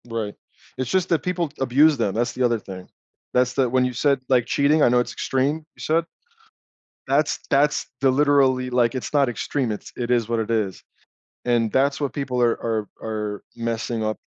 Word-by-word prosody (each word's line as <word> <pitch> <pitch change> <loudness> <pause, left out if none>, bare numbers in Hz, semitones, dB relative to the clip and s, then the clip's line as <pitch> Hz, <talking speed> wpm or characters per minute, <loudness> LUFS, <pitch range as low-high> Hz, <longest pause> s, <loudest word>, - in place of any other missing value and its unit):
Right. 115 -3 -4 0.4
It's 130 -1 -3
just 185 +2 +1
that 165 - +3
people 175 -3 -1
abuse 140 +4 +4
them, 105 -5 0
that's 120 +2 0
the 130 - -1
other 120 -2 +2
thing. 95 -3 -9 0.5
That's 125 0 +2
the 130 -3 +1
when 130 +1 +2
you 125 - -2
said, 140 +2 +2
like, 125 -3 +3
cheating, 145 +2 +3
I - - +5
know 125 0 +4
it's 120 - -2
extreme, 135 +3 0 0.2
you - - -22
said. 165 +1 +1 1.0
That's 145 +3 +1
that's 145 +1 +2
the 135 -1 +4
literally, 135 -2 +3
like, 125 -1 +2
it's 130 - -5
not 140 -3 +3
extreme, 125 +1 -2
it's 105 - -7
it 120 0 -3
is 120 -2 +1
what 115 -1 0
it 110 +1 -2
is. 105 -5 -1 0.6
And 120 -3 +1
that's 140 +1 +2
what 140 - -1
people 130 -3 -2
are 120 -1 +4
are 110 -2 -2
are 105 -2 -4
messing 115 0 -2
up. 110 0 -1
125 Hz, 195 wpm, -23 LUFS, 115-140 Hz, 1.0 s, I